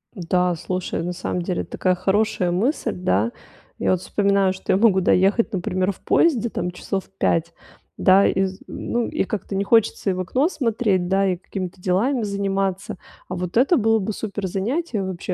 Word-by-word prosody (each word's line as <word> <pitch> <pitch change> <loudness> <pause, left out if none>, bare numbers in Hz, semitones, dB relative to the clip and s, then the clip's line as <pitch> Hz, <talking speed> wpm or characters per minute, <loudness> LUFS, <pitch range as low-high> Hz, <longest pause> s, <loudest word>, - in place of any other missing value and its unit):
Да, 180 -1 +1
слушай, 180 +1 -3
на 180 +1 -3
самом 180 0 -3
деле 175 0 -2
такая 185 -1 0
хорошая 195 -1 +1
мысль, 225 - 0
да. 115 - 0 0.5
Я - - +1
вот 185 -1 +1
вспоминаю, 200 0 +2
что 190 - -3
я - - +4
могу 200 -3 +4
доехать, 195 +6 +2
например, 185 +1 0
в 190 - -14
поезде, 245 -9 +2
там, 180 -3 -3
часов 190 +2 -4
5, 170 0 +1 0.4
да, 195 +1 +5
из 190 0 0
ну 240 0 -2
и - - -1
как-то 200 0 -4
не 195 - +1
хочется 225 -1 +2
и - - +2
в 185 - -4
окно 255 - +1
смотреть, 225 - 0
да, 195 +1 +2
и 180 - -2
какими-то 185 0 -6
делами 220 +8 +1
заниматься. 195 0 -2 0.3
А 180 - -4
вот 180 +3 -3
это 280 +8 +4
было 225 -1 +3
бы 210 +2 -3
супер 200 -2 -4
занятие. 220 - -2
Вообще, 185 -1 -4
195 Hz, 180 wpm, -22 LUFS, 180-215 Hz, 0.5 s, да